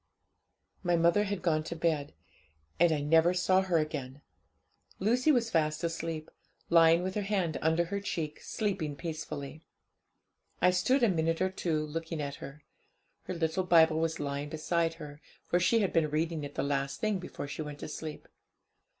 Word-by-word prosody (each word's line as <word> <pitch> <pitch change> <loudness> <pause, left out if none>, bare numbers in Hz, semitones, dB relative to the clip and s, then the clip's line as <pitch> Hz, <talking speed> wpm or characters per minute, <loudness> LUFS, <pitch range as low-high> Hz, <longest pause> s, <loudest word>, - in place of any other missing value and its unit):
'My 175 -2 +2
mother 170 +5 +3
had 200 -1 -3
gone 155 -3 +2
to 170 - -5
bed; 160 -3 -1 0.6
and 170 0 +5
I 150 -2 0
never 165 +4 +4
saw 185 +1 +3
her 185 -3 +1
again! 145 -3 -3 0.7
Lucy 245 +9 +3
was 235 -5 +1
fast 155 -1 +1
asleep, 165 -1 -3 0.4
lying 165 +1 +6
with 185 0 -2
her 210 - -1
hand 195 -5 -1
under 160 +2 +2
her 200 +4 -3
cheek, 155 -6 -4
sleeping 190 -9 -2
peacefully. 155 -2 -6 1.0
I 180 - +5
stood 250 +9 +2
a - - +6
minute 165 -3 +1
or 185 0 +1
two 160 -5 -1
looking 165 +1 -5
at 140 -1 -4
her. 140 +2 -10 0.6
Her 185 - -4
little 165 +2 0
Bible 160 -3 +5
was 165 0 -1
lying 145 0 -3
beside 165 +1 0
her, 150 -2 -10 0.2
for 175 - +1
she 220 +6 +3
had 195 - 0
been 160 -2 +2
reading 160 +1 -1
it 145 0 -7
the - - -1
last 140 0 -1
thing 215 -3 0
before 175 -5 -7
she 145 - -5
went 150 -1 -6
to - - -5
sleep. 155 0 -7
165 Hz, 175 wpm, -30 LUFS, 155-180 Hz, 1.0 s, lying